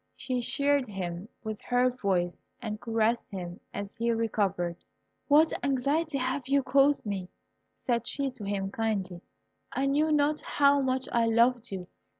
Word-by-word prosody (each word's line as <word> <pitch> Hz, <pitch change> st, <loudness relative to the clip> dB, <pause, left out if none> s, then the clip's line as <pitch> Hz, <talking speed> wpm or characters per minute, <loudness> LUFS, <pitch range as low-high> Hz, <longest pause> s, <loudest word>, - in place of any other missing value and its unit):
She 255 Hz, -1 st, -2 dB
cheered 280 Hz, +2 st, +1 dB
him 185 Hz, -1 st, -5 dB
with 215 Hz, -2 st, -4 dB
her 250 Hz, 0 st, +2 dB
voice 185 Hz, -7 st, -1 dB, 0.2 s
and 215 Hz, -3 st, -5 dB
caressed 230 Hz, 0 st, 0 dB
him 180 Hz, -2 st, -6 dB
as 200 Hz, 0 st, -5 dB
he 235 Hz, 0 st, 0 dB
recovered. 200 Hz, -6 st, 0 dB, 0.5 s
"What 305 Hz, +2 st, +5 dB
anxiety 280 Hz, +3 st, +1 dB
have 260 Hz, 0 st, -1 dB
you 275 Hz, 0 st, +3 dB
caused 275 Hz, +2 st, +3 dB
me?" 195 Hz, -3 st, -3 dB, 0.6 s
said 240 Hz, -2 st, 0 dB
she 275 Hz, -1 st, -1 dB
to 250 Hz, -4 st, -10 dB
him, 195 Hz, -1 st, -2 dB
kindly; 200 Hz, -6 st, -2 dB, 0.5 s
"I 270 Hz, -, 0 dB
knew 295 Hz, +3 st, +2 dB
not 300 Hz, 0 st, +2 dB
how 280 Hz, 0 st, +3 dB
much 260 Hz, 0 st, 0 dB
I 235 Hz, -1 st, +2 dB
loved 235 Hz, +1 st, +3 dB
you. 185 Hz, -2 st, -5 dB
235 Hz, 150 wpm, -29 LUFS, 200-275 Hz, 0.6 s, What